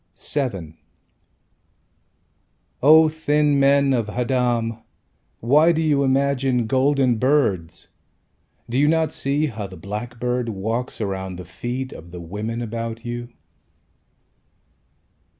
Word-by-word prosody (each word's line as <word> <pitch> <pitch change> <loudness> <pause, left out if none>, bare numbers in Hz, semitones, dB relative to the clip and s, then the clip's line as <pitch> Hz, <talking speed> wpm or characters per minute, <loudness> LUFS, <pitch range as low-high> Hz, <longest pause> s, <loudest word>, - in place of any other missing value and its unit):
VII 95 - -3 2.0
O 155 +3 +7
thin 150 -2 +1
men 140 0 +4
of 115 -4 -1
Haddam, 120 -1 0 0.6
Why 150 +8 +5
do 165 - 0
you 150 -3 +2
imagine 135 -2 +1
golden 130 0 +2
birds? 110 - 0 0.8
Do 120 +2 -1
you 145 - +4
not 160 0 +1
see 140 +3 0
how 110 -7 -5
the 95 -1 -12
blackbird 120 +5 -3
Walks 115 +5 -3
around 95 -2 -3
the 90 0 -8
feet 120 +9 -5
Of 85 - -11
the 90 - -8
women 105 +7 -4
about 115 0 -5
you? 120 0 -5
125 Hz, 110 wpm, -22 LUFS, 110-140 Hz, 2.0 s, O